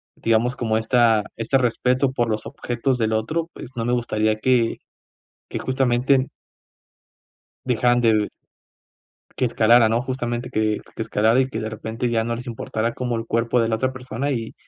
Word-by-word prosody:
digamos, 115 +3 +1
como 110 -2 0
esta 115 -1 +3
este 115 +4 +1
respeto 125 +2 +1
por 120 -3 0
los 110 -1 -2
objetos 125 +1 -2
del 110 -1 +1
otro, 155 +10 -1
pues - - -9
no 115 -1 -2
me 120 - +1
gustaría 110 -3 +1
que 120 -1 +2 0.7
que - - -4
justamente 130 0 +1 1.4
dejaran 120 0 +2
de 110 -3 +3 1.1
que - - +2
escalara, 115 -1 +5
¿no? 115 +1 +2
Justamente 120 -2 -3
que 110 -1 0 0.2
que - - -2
escalara, 110 +2 +2
y 130 - +2
que 115 -4 -4
de 110 - -3
repente 110 +2 -4
ya 115 -1 +1
no 115 - -2
les 120 +2 -7
importara 115 -1 -3
como 125 -2 -2
el 115 0 -4
cuerpo 115 +1 +1
de 115 - +1
la 110 - +1
otra 130 +3 -1
persona, 130 +2 -4
y 115 -3 -4
120 Hz, 170 wpm, -22 LUFS, 110-125 Hz, 1.4 s, escalara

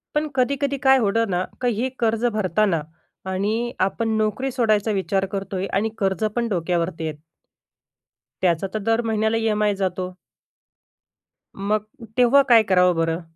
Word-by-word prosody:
पण 305 +1 +1
कधी-कधी 280 +2 0
काय 265 0 +6
होतं 225 +1 +1
ना, 180 0 0 0.2
की 245 - +2
हे 260 - 0
कर्ज 225 0 +1
भरताना 185 -3 +1 0.5
आणि 220 +5 -1 0.2
आपण 220 +2 -2
नोकरी 215 +5 -1
सोडायचा 220 -4 +1
विचार 195 -1 0
करतोय, 195 -1 -3
आणि 215 +3 0
कर्ज 195 0 -1
पण 240 -1 0
डोक्यावरती 170 -2 -1
येतं. 150 -1 -5 1.2
त्याचा 175 +1 +1
तर 215 - -1
दर 225 +1 +2
महिन्याला 220 0 +1
ई-एम-आय 210 -2 +1
जातो. 185 -1 -2 1.5
मग 210 +2 -1 0.3
तेव्हा 250 +3 +6
काय 230 -2 +7
करावं 180 -3 +3
बरं? 165 +1 0
210 Hz, 140 wpm, -22 LUFS, 185-230 Hz, 1.5 s, काय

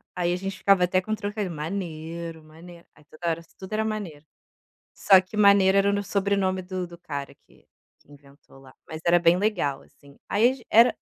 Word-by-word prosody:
aí 175 -1 0
a - - 0
gente 195 +1 -5
ficava 195 -1 +3
até 185 +1 +2
com 215 - -7
o - - +2
trocadilho 205 -3 -4
"Manero, 165 0 -6
Manero", 170 +2 -15
aí - - -21
toda 170 +3 -5
hora 165 0 -2 0.2
tudo 190 +2 -9
era 220 +1 0
Manero. 195 -9 -5 0.7
Só 190 -2 +6
que 185 +3 -12
Maneiro 200 -2 +5
era 200 0 +3
no 200 0 -1
sobrenome 195 -1 0
do 185 0 -5
do 170 0 -13
cara 145 -5 -6
que - - -25 0.3
que - - -25
inventou 140 -1 -19
lá, 130 -1 -17
mas 160 - -8
era 175 0 +5
bem 175 0 +4
legal 185 -9 -1
assim, 140 0 -21
aí 220 +4 +3
ag 260 -3 -10
era 230 +3 +5
180 Hz, 200 wpm, -25 LUFS, 160-200 Hz, 0.7 s, Só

